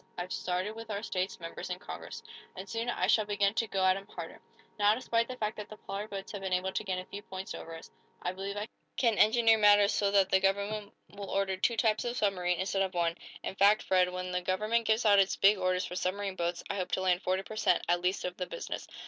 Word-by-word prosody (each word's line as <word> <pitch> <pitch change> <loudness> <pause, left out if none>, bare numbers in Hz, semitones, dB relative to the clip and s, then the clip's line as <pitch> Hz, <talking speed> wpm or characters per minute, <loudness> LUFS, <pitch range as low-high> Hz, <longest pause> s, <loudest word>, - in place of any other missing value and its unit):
"I've 180 +1 -4
started 185 +4 -2
with 225 0 -9
our 205 0 -3
state's 185 -3 -2
members 165 +1 -7
in 180 - -3
Congress, - - -8 0.3
and 190 +1 -7
soon 230 +3 -3
I 185 -6 0
shall 215 +2 +3
begin 205 -1 +1
to 230 0 0
go 190 -2 0
at 185 0 +5
'em 195 +1 -8
harder. 170 -5 -8 0.4
Now, 205 +1 +5
despite 230 -1 0
the 255 - -6
fact 215 -2 -2
that 210 -1 -7
the 215 - -10
Pollard 205 +2 -6
boats 195 -1 -6
have 205 - -6
been 190 -1 -2
able 185 +1 0
to - - -2
gain 190 -3 -2
a 185 - -5
few 200 +2 -8
points 190 -1 -7
over 165 0 -8
us, - - -13 0.3
I 180 - 0
believe 195 +2 -5
I 210 +1 -3 0.3
can 230 -4 +2
engineer 225 0 +5
matters 205 -1 +6
so 200 - +2
that 200 -1 +3
the 190 - +5
government 200 +2 0 0.2
will 200 -1 -7
order 195 -1 0
two 230 +5 0
types 220 -2 +2
of 240 0 -3
submarine, 180 -5 +1
instead 195 +1 0
of 190 -1 -1
one. 170 -1 +1 0.3
In - - -3
fact, 200 +2 +4
Fred, 185 -1 +3
when 180 0 -4
the 180 0 -1
government 215 +6 0
gives 220 +1 +2
out 205 -2 +6
its 195 -1 +3
big 200 0 +5
orders 185 0 +1
for 180 - -6
submarine 195 +1 -2
boats, 175 -1 -2
I 200 - -3
hope 185 -2 -3
to - - +1
land 180 -1 +2
forty 185 0 0
per 215 - -9
cent., 180 -4 +2
at 175 +1 +2
least, 180 +2 0
of 180 0 -3
the 180 - -3
business." - - -6
195 Hz, 255 wpm, -31 LUFS, 185-210 Hz, 0.4 s, matters